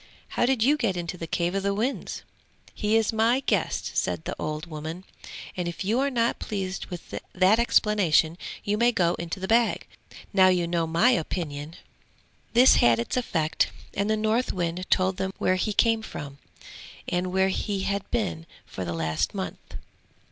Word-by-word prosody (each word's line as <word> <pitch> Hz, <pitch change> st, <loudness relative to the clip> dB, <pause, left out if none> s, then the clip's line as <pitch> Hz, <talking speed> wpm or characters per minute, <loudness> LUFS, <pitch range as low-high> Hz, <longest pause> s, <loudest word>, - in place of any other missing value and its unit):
How 240 Hz, -, +1 dB
did 255 Hz, -4 st, +2 dB
you 290 Hz, +5 st, +4 dB
get 220 Hz, -10 st, 0 dB
into 170 Hz, 0 st, -4 dB
the 165 Hz, -2 st, -6 dB
cave 175 Hz, +2 st, -1 dB
of 195 Hz, -, 0 dB
the 200 Hz, 0 st, 0 dB
winds?' 240 Hz, +7 st, -3 dB, 0.5 s
'He 215 Hz, +1 st, +1 dB
is 225 Hz, 0 st, +1 dB
my 230 Hz, +4 st, +3 dB
guest,' 205 Hz, -9 st, -1 dB
said 85 Hz, -3 st, -1 dB
the -, -, -3 dB
old 155 Hz, +1 st, -3 dB
woman, 160 Hz, +2 st, -6 dB, 0.5 s
'and 180 Hz, -2 st, -2 dB
if 170 Hz, +2 st, -5 dB
you 225 Hz, +5 st, +1 dB
are 280 Hz, +1 st, +2 dB
not 235 Hz, -3 st, 0 dB
pleased 195 Hz, -2 st, -4 dB
with 175 Hz, -2 st, -9 dB, 0.2 s
that 190 Hz, +4 st, +4 dB
explanation 185 Hz, -8 st, +3 dB, 0.2 s
you 210 Hz, +1 st, -1 dB
may 240 Hz, +1 st, +4 dB
go 175 Hz, -6 st, +2 dB
into 170 Hz, +3 st, -4 dB
the 190 Hz, -, -4 dB
bag! 230 Hz, +2 st, +2 dB, 0.5 s
Now 190 Hz, -1 st, +6 dB
you 180 Hz, -2 st, +3 dB
know 170 Hz, -1 st, 0 dB
my 170 Hz, +10 st, +4 dB
opinion!' 160 Hz, -, -3 dB, 0.8 s
This 250 Hz, +3 st, +7 dB
had 120 Hz, -1 st, +5 dB
its 115 Hz, -, -2 dB
effect, 165 Hz, -11 st, 0 dB, 0.3 s
and 200 Hz, +1 st, -1 dB
the 215 Hz, -, +2 dB
Northwind 185 Hz, -6 st, -1 dB
told 185 Hz, 0 st, +2 dB
them 190 Hz, 0 st, -3 dB
where 185 Hz, -, +1 dB
he 215 Hz, +3 st, 0 dB
came 225 Hz, +1 st, +3 dB
from, 140 Hz, -9 st, -8 dB, 0.7 s
and 180 Hz, +1 st, -1 dB
where 190 Hz, +1 st, +2 dB
he 195 Hz, +1 st, -2 dB
had 200 Hz, +1 st, -2 dB
been 190 Hz, -8 st, -2 dB, 0.2 s
for 95 Hz, -, -6 dB
the 85 Hz, -1 st, -3 dB
last 80 Hz, -2 st, -1 dB
month. -, -, -6 dB
190 Hz, 175 wpm, -26 LUFS, 170-220 Hz, 0.8 s, This